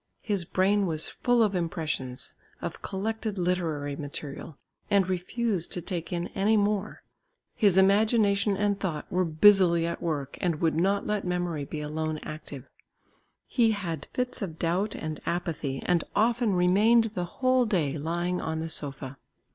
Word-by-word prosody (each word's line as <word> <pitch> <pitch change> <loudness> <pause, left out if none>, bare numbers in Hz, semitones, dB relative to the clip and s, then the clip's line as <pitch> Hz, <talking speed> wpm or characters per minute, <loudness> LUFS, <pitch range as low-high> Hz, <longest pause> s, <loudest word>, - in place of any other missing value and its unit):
His 200 -6 0
brain 195 +3 +2
was 155 -2 0
full 245 -1 +2
of 210 -2 +1
impressions, 155 -7 -2 0.3
of - - -6
collected 215 +1 -3
literary 165 -6 -1
material, 145 0 -7 0.3
and 200 -2 +3
refused 185 +1 -2
to - - -2
take 175 -2 -4
in 175 -1 -2
any 210 +3 +2
more; 205 0 -1 0.5
his 200 -5 +4
imagination 200 0 +4
and 205 0 +1
thought 160 -6 -3
were 185 0 +2
busily 170 0 +5
at 170 - -3
work 145 -5 -3
and 170 -4 0
would 165 -1 +2
not 195 +5 +1
let 210 -1 -1
memory 175 -5 -2
be 150 +2 -5
alone 155 +1 -2
active; 145 -3 -8 0.8
he 230 -3 +2
had 170 -7 -4
fits 250 -1 -2
of 165 -5 -4
doubt 180 +6 0
and 155 0 -5
apathy 160 -6 -2
and 175 -2 +2
often 230 -1 +2
remained 210 +6 +4
the 180 -5 -2
whole 255 +5 +2
day 160 -9 0
lying 175 +4 -1
on 160 0 -2
the 165 +1 -3
sofa. 140 -3 -5
180 Hz, 155 wpm, -28 LUFS, 160-205 Hz, 0.8 s, busily